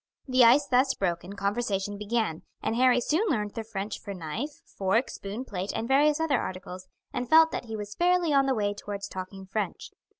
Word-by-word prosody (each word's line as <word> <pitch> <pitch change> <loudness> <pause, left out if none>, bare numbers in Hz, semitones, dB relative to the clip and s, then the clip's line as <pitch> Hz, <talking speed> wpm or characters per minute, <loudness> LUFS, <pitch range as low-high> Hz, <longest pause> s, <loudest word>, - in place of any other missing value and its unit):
The 255 -1 +5
ice 255 +5 +6
thus 265 0 +3
broken, 180 0 -2
conversation 200 0 -1
began, 210 -5 -1 0.2
and 225 - 0
Harry 250 0 +4
soon 320 - +1
learned 210 -8 -1
the 225 - -4
French 210 -1 -5
for 200 -2 -6
knife, 195 - -5
fork, 200 +6 0
spoon, 205 +6 -6
plate, 195 -4 -4
and 225 +1 -2
various 290 +3 +4
other 310 -5 +1
articles, 185 0 -7 0.3
and 245 -1 -3
felt 320 0 +7
that - - -4
he 225 -1 -5
was 205 -1 -6
fairly 350 - +2
on 275 -1 +4
the 265 - +2
way 205 -2 0
towards 205 -1 -6
talking 190 0 -7
French. 195 -1 -4
220 Hz, 195 wpm, -28 LUFS, 200-265 Hz, 0.3 s, felt